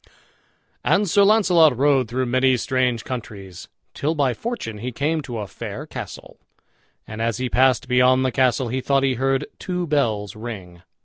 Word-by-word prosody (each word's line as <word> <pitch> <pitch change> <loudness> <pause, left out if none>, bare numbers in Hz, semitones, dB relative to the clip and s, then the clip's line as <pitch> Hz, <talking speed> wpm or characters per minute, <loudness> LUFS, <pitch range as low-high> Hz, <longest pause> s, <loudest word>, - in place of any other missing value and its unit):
And 205 +1 +2
Sir 200 +4 +3
Launcelot 180 - +4
rode 135 -2 +3
through 130 +3 -2
many 130 +1 +2
strange 125 -2 0
countries, 100 -7 -8 0.3
till 155 +3 -2
by 140 -4 +1
fortune 165 - -5
he 125 +4 -4
came 155 +6 -1
to 125 -5 -6
a 105 - -4
fair - - -7
castle; - - -9 0.7
and 110 +1 -7
as 115 -1 -1
he 130 0 -2
passed 130 +1 +3
beyond 125 +1 +3
the 130 - +1
castle 130 -1 +1
he 130 +2 -2
thought 135 +1 +1
he 135 -1 +2
heard 135 +2 0
two 180 -2 -3
bells 115 - -1
ring. 100 -6 -8
130 Hz, 170 wpm, -22 LUFS, 115-140 Hz, 0.7 s, Launcelot